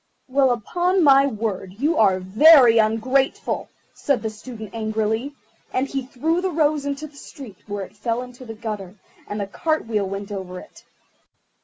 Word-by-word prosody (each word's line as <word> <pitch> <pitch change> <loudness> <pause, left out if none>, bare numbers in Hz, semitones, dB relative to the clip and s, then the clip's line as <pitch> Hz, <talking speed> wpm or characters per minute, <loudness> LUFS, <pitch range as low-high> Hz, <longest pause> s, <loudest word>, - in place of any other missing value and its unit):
"Well, 265 0 +3
upon 350 - +1
my 275 -1 +6
word, 205 -6 -4
you 295 +7 +1
are 195 -4 +3
very 230 - +6
ungrateful," 230 +5 0 0.2
said 280 -5 -1
the 220 - -2
Student 215 -1 -10
angrily; 220 +4 -2 0.4
and 260 +2 0
he 275 -1 -3
threw 320 +7 -1
the 380 - 0
rose 300 -3 +1
into 285 +2 -3
the 295 -1 -14
street, 270 - -11
where 205 -1 -4
it 190 - -19
fell 230 +3 -2
into 250 0 -12
the 225 -2 -8
gutter, 210 -4 -6 0.3
and 205 - -4
a - - -3
cart 310 +10 -2
wheel 210 -4 -1
went 195 +1 -6
over 185 -2 -6
it. - - -16
230 Hz, 170 wpm, -22 LUFS, 210-280 Hz, 0.4 s, my